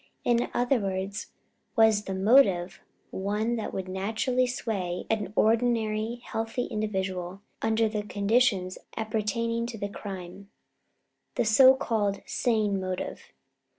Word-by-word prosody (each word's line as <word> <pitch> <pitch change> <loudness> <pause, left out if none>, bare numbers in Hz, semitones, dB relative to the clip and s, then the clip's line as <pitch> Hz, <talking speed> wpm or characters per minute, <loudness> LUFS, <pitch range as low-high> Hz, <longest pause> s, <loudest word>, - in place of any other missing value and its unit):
In 240 0 +2
other 245 +1 +2
words, 195 0 -3 0.5
was 220 -2 +4
the 190 - -3
motive 190 -4 +4 0.3
one 210 +5 -1
that 220 - -4
would 190 -1 -4
naturally 220 +7 0
sway 195 -8 -3
an 210 -3 -1
ordinary 225 0 +1
healthy 225 +2 -2
individual 190 -3 -3 0.2
under 225 0 +2
the 215 -1 -2
conditions 205 -2 +1 0.2
appertaining 230 +1 -1
to 235 -2 -6
the 205 -1 -3
crime 195 -1 -8 0.9
the - - +1
so 260 +5 +7
called 210 -6 -1
sane 215 -5 0
motive? 185 -1 -5
215 Hz, 120 wpm, -27 LUFS, 195-230 Hz, 0.9 s, so